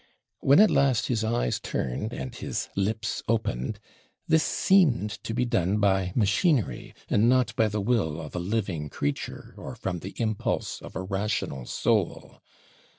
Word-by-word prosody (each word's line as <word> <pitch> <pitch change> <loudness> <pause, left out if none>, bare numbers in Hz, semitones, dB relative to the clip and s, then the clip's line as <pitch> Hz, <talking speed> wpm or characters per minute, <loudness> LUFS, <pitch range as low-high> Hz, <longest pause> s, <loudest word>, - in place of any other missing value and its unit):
When, 140 +5 +5
at 215 0 +7
last, 135 -5 +2
his 115 -3 0
eyes 110 - 0
turned, 70 - -3
and 125 +1 -5
his - - -4
lips 105 +2 -1
opened, 105 - -1 0.5
this 160 -1 +4
seemed 150 - +3
to - - -4
be 125 +2 0
done 105 -5 +1
by 95 -3 +2
machinery, 105 - +1
and 110 +3 +3
not 125 -2 +2
by 110 - +3
the 105 0 -2
will 100 -9 0
of 75 -3 -8
a - - -1
living 90 -5 -2
creature, 70 +1 -4
or - - -7
from 90 -2 -3
the 95 +4 -8
impulse 110 -3 -1
of - - -11
a 95 - -3
rational 95 - -2
soul. - - -1
105 Hz, 155 wpm, -27 LUFS, 95-120 Hz, 0.5 s, at